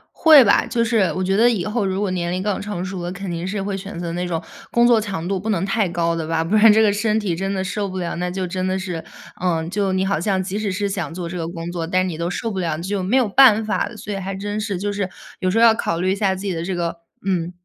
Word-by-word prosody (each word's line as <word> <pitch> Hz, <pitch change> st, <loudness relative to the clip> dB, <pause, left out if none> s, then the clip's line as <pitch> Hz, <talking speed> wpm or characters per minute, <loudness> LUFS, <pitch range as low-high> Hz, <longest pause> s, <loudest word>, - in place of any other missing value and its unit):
会 310 Hz, -4 st, +8 dB
吧， -, -, +4 dB
就 235 Hz, -2 st, 0 dB
是 225 Hz, -1 st, +2 dB, 0.2 s
我 185 Hz, -, -1 dB
觉 190 Hz, +1 st, +1 dB
得 230 Hz, +4 st, +5 dB
以 205 Hz, -7 st, -1 dB
后 215 Hz, 0 st, -1 dB
如 190 Hz, 0 st, -1 dB
果 205 Hz, -1 st, 0 dB
年 175 Hz, -1 st, -2 dB
龄 185 Hz, +1 st, -2 dB
更 205 Hz, -1 st, -1 dB
成 200 Hz, -3 st, -4 dB
熟 185 Hz, -1 st, -5 dB
了， 175 Hz, -, -3 dB
肯 195 Hz, +1 st, -6 dB
定 170 Hz, 0 st, -3 dB
是 200 Hz, +1 st, -2 dB
会 195 Hz, 0 st, -3 dB
选 195 Hz, -2 st, -7 dB
择 170 Hz, -1 st, -4 dB
那 175 Hz, +1 st, -2 dB
种 165 Hz, -2 st, -2 dB, 0.3 s
工 235 Hz, 0 st, +4 dB
作 235 Hz, -2 st, +5 dB
强 195 Hz, -6 st, -4 dB
度 195 Hz, 0 st, -1 dB
不 210 Hz, +4 st, -4 dB
能 190 Hz, -3 st, 0 dB
太 195 Hz, -1 st, +1 dB
高 170 Hz, -1 st, 0 dB
的 165 Hz, -1 st, -3 dB
吧， 165 Hz, 0 st, 0 dB
不 175 Hz, +6 st, 0 dB
然 215 Hz, +1 st, +7 dB
这 220 Hz, +1 st, +5 dB
个 210 Hz, -2 st, +4 dB
身 215 Hz, +1 st, +1 dB
体 195 Hz, -6 st, -1 dB
真 195 Hz, +3 st, -2 dB
的 190 Hz, -1 st, -1 dB
受 200 Hz, +1 st, -2 dB
不 190 Hz, -, -6 dB
了。 175 Hz, -2 st, -3 dB
那 180 Hz, +1 st, -2 dB
就 185 Hz, +1 st, -3 dB
真 185 Hz, +1 st, -3 dB
的 185 Hz, 0 st, 0 dB
是， 180 Hz, -4 st, -4 dB, 0.4 s
嗯， 165 Hz, -3 st, 0 dB
就 195 Hz, 0 st, 0 dB
你 190 Hz, 0 st, +1 dB
好 195 Hz, -4 st, 0 dB
像 190 Hz, +2 st, 0 dB
即 190 Hz, +2 st, -4 dB
使 210 Hz, -2 st, -1 dB
是 200 Hz, +2 st, -1 dB
想 195 Hz, -4 st, -3 dB
做 175 Hz, 0 st, -5 dB
这 170 Hz, -, -6 dB
个 165 Hz, -1 st, -3 dB
工 165 Hz, 0 st, -6 dB
作， 170 Hz, -2 st, -3 dB
但 185 Hz, +2 st, +1 dB
你 175 Hz, -, -4 dB
都 170 Hz, +1 st, -2 dB
受 225 Hz, +5 st, -3 dB
不 195 Hz, -, -3 dB
了， 165 Hz, -4 st, -1 dB
就 195 Hz, +3 st, -2 dB
没 195 Hz, +8 st, +1 dB
有 250 Hz, -4 st, +3 dB
办 220 Hz, 0 st, +6 dB
法 215 Hz, -, 0 dB
了。 230 Hz, -, -10 dB
所 210 Hz, 0 st, -6 dB
以 -, -, -3 dB
还 195 Hz, 0 st, -4 dB
真 205 Hz, +2 st, -3 dB
是， 205 Hz, -3 st, -2 dB
就 205 Hz, +3 st, -2 dB
是 200 Hz, -2 st, -2 dB, 0.3 s
有 185 Hz, -, 0 dB
时 195 Hz, -, 0 dB
候 230 Hz, -, +5 dB
要 225 Hz, -, +7 dB
考 170 Hz, -6 st, -2 dB
虑 185 Hz, +1 st, +1 dB
一 -, -, +1 dB
下 195 Hz, -2 st, +1 dB
自 190 Hz, -, -8 dB
己 195 Hz, -, -1 dB
的 165 Hz, -1 st, -3 dB
这 185 Hz, +1 st, -3 dB
个， 170 Hz, -1 st, -3 dB, 0.3 s
嗯， 180 Hz, -3 st, 0 dB
190 Hz, 335 characters per minute, -21 LUFS, 175-205 Hz, 0.4 s, 会